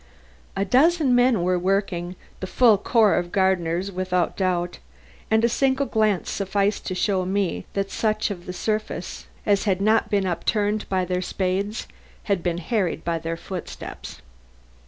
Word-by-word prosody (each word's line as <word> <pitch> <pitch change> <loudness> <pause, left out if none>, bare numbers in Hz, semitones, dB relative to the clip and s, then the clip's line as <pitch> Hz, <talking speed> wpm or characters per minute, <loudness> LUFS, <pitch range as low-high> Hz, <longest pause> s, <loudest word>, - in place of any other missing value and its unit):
A 195 0 0
dozen 285 - +4
men 245 -6 +4
were 180 0 +1
working 185 -1 -1 0.2
the 185 - -4
full 220 0 +4
corps 220 -1 +3
of 175 0 -5
gardeners 190 -1 +1
without 180 -1 -1
doubt 180 -2 -1 0.5
and 220 +1 +3
a - - +5
single 265 +3 +1
glance 215 -6 +1
sufficed 200 +1 -1
to 185 - -2
show 190 0 +1
me 190 0 -1
that 195 0 -2
such 215 -1 0
of 175 -3 -7
the - - -3
surface 215 +4 -3 0.2
as 205 -1 +2
had 190 -3 +1
not 215 +3 +2
been 200 -2 +1
upturned 205 +4 -1
by 185 -1 +1
their 180 0 -1
spades 195 +3 -2 0.4
had 200 -4 0
been 170 -1 -1
harried 180 -2 -1
by 170 -1 0
their 165 +1 -4
footsteps. 180 +1 -8
195 Hz, 155 wpm, -24 LUFS, 180-215 Hz, 0.5 s, a